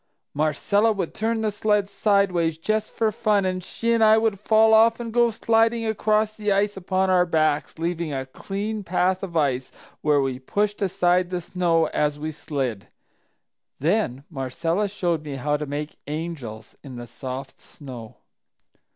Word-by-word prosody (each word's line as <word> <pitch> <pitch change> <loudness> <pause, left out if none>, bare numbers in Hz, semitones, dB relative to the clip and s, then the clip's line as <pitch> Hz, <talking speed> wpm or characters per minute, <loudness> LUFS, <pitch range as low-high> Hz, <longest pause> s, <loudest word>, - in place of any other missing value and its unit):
"Marcella 155 +9 +2
would 195 -6 -3
turn 225 +1 -1
the 215 -1 0
sled 210 -1 +1
sideways, 195 -6 +1
just 215 +6 -1
for 220 -1 0
fun, 210 -3 +1
and 185 -1 -2
she 230 +5 -1
and 230 -1 +3
I 220 0 +7
would 220 -3 +1
fall 220 +1 +4
off 225 +1 +5
and 230 -2 -5
go 240 0 +4
sliding 225 +1 +2
across 215 0 +1
the 210 -1 -1
ice 200 +1 +1
upon 190 0 0
our 180 -1 +5
backs, 155 -2 +1
leaving 170 -1 -2
a 135 -1 -3
clean 205 +9 -4
path 185 0 +1
of 175 -4 -4
ice, 130 -4 0 0.3
where 150 -1 +3
we 135 -2 -1
pushed 205 +10 -1
aside 180 -2 +2
the 180 -1 -2
snow 170 -1 +1
as 150 -1 0
we 155 +1 -4
slid. 135 -9 -4 0.9
Then 150 - 0
Marcella 165 +8 -1
showed 175 -5 -1
me 145 -2 -5
how 150 +3 0
to 150 0 -3
make 150 +2 -5
'angels' 145 -9 -6
in 135 -3 -9
the 120 0 -7
soft 130 +2 -7
snow!" 125 -6 -11
180 Hz, 165 wpm, -24 LUFS, 150-210 Hz, 0.9 s, I